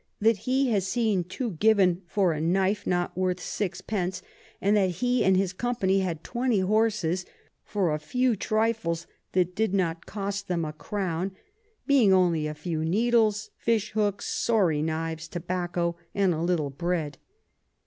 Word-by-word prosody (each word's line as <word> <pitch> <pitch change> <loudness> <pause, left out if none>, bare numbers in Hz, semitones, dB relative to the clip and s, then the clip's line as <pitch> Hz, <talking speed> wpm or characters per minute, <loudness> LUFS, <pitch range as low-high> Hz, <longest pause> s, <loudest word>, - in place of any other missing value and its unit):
_ - - -43 0.2
that 220 0 +4
he 265 -1 +2
has 195 -3 +1
seen 215 -4 +1
two 220 +7 -4
given 190 -1 +3
for 185 0 +2
a 150 - -3
Knife 190 +4 +1
not 175 -1 0
worth 185 0 0
6 200 -1 -3
d. 190 -5 0 0.5
and 200 +2 +2
that 195 -3 +3
he 245 +7 +1
and 190 -1 +4
his 190 -1 0
Company 195 -3 +1
had 170 -4 -2
20 240 -4 0
Horses 200 -3 +1 0.4
for 190 -7 0
a 150 - -1
few 250 +9 +1
Trifles 215 -6 0 0.3
that 180 -1 +2
did 220 -2 +1
not 165 -3 -1
cost 200 -1 -4
them 170 -3 -1
a 150 - -5
Crown; 185 +2 -3 0.5
being 265 -8 +5
only 175 -5 +3
a 150 - -5
few 155 +1 -3
Needles, 220 +3 +2
Fish 220 -3 0
Hooks, 205 -2 0
sorry 185 -10 +1
Knives, 160 +1 -3
Tobacco, 175 0 -2 0.2
and 195 -3 +3
a 160 - -3
little 165 -5 0
Bread. 165 0 -2
190 Hz, 160 wpm, -27 LUFS, 170-215 Hz, 0.5 s, being